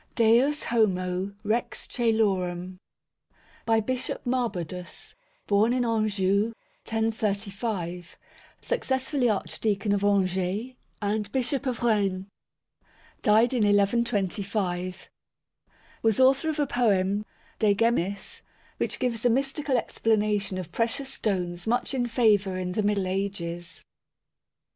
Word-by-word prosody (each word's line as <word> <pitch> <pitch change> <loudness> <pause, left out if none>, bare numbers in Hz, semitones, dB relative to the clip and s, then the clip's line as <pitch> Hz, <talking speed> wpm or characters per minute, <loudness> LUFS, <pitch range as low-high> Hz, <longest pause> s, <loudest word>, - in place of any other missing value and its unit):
DEUS 245 +6 +4
HOMO, 190 -3 0
REX 225 +3 -1
CŒLORUM 185 -6 0 0.9
By 225 -1 +4
Bishop 255 +3 -3
Marbodus. 235 - -3 0.3
Born 210 +4 +3
in 250 -1 +1
Anjou, 215 -1 +1 0.3
1035; 205 -5 -2 0.4
successively 265 - 0
Archdeacon 205 0 -1
of 200 0 +1
Angers 195 +3 +1 0.3
and 205 0 -1
Bishop 265 +2 0
of 245 -2 -2
Rennes; 200 -5 +1 1.0
died 220 +4 +4
in 245 - +1
1125. 200 -3 0 0.9
Was 225 -1 +2
author 265 +4 +4
of 310 - -2
a 295 - +2
poem 205 -5 +1 0.4
De 205 -2 +4
Gemmis, 200 -3 0 0.4
which - - -2
gives 235 -3 -1
a 245 - +4
mystical 270 +2 0
explanation 210 -4 0
of 180 -2 -6
precious 250 +6 -2
stones 180 -5 -2
much 240 +4 0
in 245 -2 0
favour 210 -6 +2
in 180 -1 -3
the 215 - 0
Middle 205 -2 +1
Ages. 185 -3 -4
210 Hz, 105 wpm, -27 LUFS, 190-235 Hz, 1.0 s, DEUS